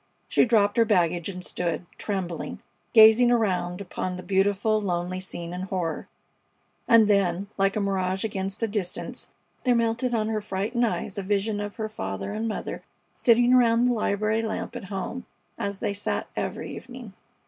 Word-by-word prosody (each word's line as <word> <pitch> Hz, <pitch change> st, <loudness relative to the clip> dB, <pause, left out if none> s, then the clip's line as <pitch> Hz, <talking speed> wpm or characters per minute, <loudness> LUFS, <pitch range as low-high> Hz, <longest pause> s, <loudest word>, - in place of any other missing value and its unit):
She -, -, +4 dB
dropped 210 Hz, -3 st, +3 dB
her 230 Hz, -, +6 dB
baggage 175 Hz, -5 st, +1 dB
and 180 Hz, -2 st, -6 dB
stood, 175 Hz, 0 st, -2 dB
trembling, 185 Hz, -5 st, -3 dB, 0.3 s
gazing 220 Hz, +1 st, +8 dB
around 190 Hz, -6 st, +1 dB
upon 185 Hz, -1 st, -4 dB
the 180 Hz, -, -8 dB
beautiful, 205 Hz, +3 st, +2 dB
lonely 180 Hz, -1 st, -2 dB
scene 175 Hz, -2 st, -5 dB
in 180 Hz, -, -4 dB
horror; 185 Hz, -4 st, -3 dB, 0.8 s
and 230 Hz, -2 st, +6 dB
then, 195 Hz, -1 st, +1 dB
like 195 Hz, 0 st, +1 dB
a -, -, +1 dB
mirage 190 Hz, -2 st, 0 dB
against 195 Hz, -1 st, -3 dB
the 225 Hz, -, +2 dB
distance, 200 Hz, -4 st, -3 dB, 0.3 s
there 250 Hz, -2 st, +3 dB
melted 235 Hz, +1 st, +1 dB
on 215 Hz, -1 st, 0 dB
her 215 Hz, -1 st, -1 dB
frightened 210 Hz, +5 st, 0 dB
eyes 205 Hz, -2 st, -3 dB
a -, -, -1 dB
vision 205 Hz, +2 st, 0 dB
of 205 Hz, 0 st, -5 dB
her 220 Hz, -1 st, -3 dB
father 95 Hz, -, -5 dB
and 220 Hz, +2 st, -2 dB
mother 215 Hz, -, -4 dB, 0.3 s
sitting 240 Hz, +1 st, +4 dB
around 240 Hz, -1 st, +5 dB
the 250 Hz, -, +3 dB
library 215 Hz, 0 st, 0 dB
lamp 220 Hz, -1 st, -4 dB
at -, -, -6 dB
home, 195 Hz, +6 st, -5 dB, 0.3 s
as 200 Hz, -1 st, -2 dB
they 200 Hz, -, -2 dB
sat 205 Hz, +1 st, -2 dB
every -, -, -4 dB
evening. 245 Hz, -5 st, -10 dB
205 Hz, 170 wpm, -26 LUFS, 185-225 Hz, 0.8 s, gazing